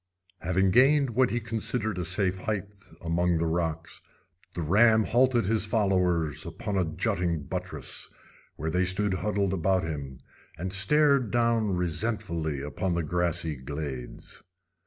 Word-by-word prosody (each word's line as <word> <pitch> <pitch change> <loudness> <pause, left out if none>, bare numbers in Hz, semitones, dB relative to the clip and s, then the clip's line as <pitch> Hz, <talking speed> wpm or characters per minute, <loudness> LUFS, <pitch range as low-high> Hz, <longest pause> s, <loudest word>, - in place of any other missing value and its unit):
Having 95 +2 +1
gained 135 +4 +4
what 125 +2 +3
he 120 - -1
considered 110 -3 -2
a 90 - -2
safe 95 +1 0
height 105 0 -3 0.3
among 85 +1 +1
the 85 - 0
rocks, 80 -1 -2 0.5
the 85 - -2
ram 110 +7 +5
halted 120 0 +2
his 110 +1 0
followers 90 - +1
upon 105 - -5
a 95 - +2
jutting 85 -1 -1
buttress, - - -6 0.5
where 80 +2 -3
they 90 +2 +1
stood 95 +2 +1
huddled 100 -1 -1
about 95 0 +1
him, 70 -5 -5 0.4
and 95 +3 -4
stared 140 +5 +4
down 115 -5 +1
resentfully 85 -5 -2
upon 85 +5 -2
the 85 - 0
grassy 85 -1 -1
glades. 65 -1 -7
95 Hz, 135 wpm, -27 LUFS, 80-110 Hz, 0.5 s, ram